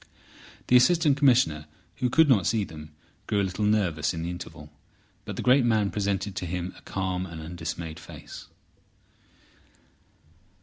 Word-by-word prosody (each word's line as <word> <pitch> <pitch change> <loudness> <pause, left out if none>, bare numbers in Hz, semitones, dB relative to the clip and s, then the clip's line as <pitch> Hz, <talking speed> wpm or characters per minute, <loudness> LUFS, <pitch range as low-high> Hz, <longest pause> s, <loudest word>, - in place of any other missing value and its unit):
The 125 - +3
Assistant 145 +3 +5
Commissioner, 120 - +3 0.3
who 125 -1 0
could 160 +5 +5
not 110 -10 +4
see 110 -2 +1
them, 75 -4 -9 0.4
grew 105 - +1
a - - +2
little 95 +3 -2
nervous 90 -8 +1
in 80 - -4
the 85 - -3
interval. 90 0 -9 0.5
But - - -6
the - - -4
great 130 +1 +5
man 110 -4 +2
presented 100 -1 -2
to 90 - -3
him 90 +1 -4
a - - -15
calm 95 -1 -3
and 85 -2 -8
undismayed 80 0 -6
face. - - -11
95 Hz, 155 wpm, -26 LUFS, 85-120 Hz, 0.5 s, Assistant